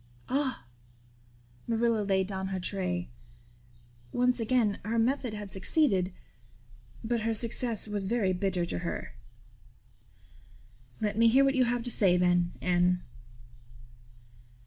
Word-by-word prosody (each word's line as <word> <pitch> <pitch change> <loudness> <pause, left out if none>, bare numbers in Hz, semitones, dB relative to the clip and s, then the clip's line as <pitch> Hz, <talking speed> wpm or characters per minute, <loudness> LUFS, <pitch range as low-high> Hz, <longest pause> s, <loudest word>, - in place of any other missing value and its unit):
"Ah!" 265 - -1 1.0
Marilla 230 -1 +1
laid 195 -2 +1
down 190 0 -4
her 190 -1 -3
tray. 180 -1 -2 1.0
Once 250 0 +1
again 225 -3 +1
her 225 +2 -2
method 245 -1 0
had 205 -2 -7
succeeded; 195 - +1 0.9
but 235 +1 0
her 225 +1 -1
success 230 0 0
was 205 -2 -2
very 205 -4 +1
bitter 180 -1 0
to 90 - -3
her. - - -5 1.9
"Let 210 0 -1
me 230 - +6
hear 265 +4 +5
what 275 - +3
you 260 -2 +3
have 240 0 -1
to 245 - -4
say 185 -5 +3
then, 175 -1 +2
Anne." 180 0 +2
210 Hz, 125 wpm, -29 LUFS, 185-235 Hz, 1.9 s, me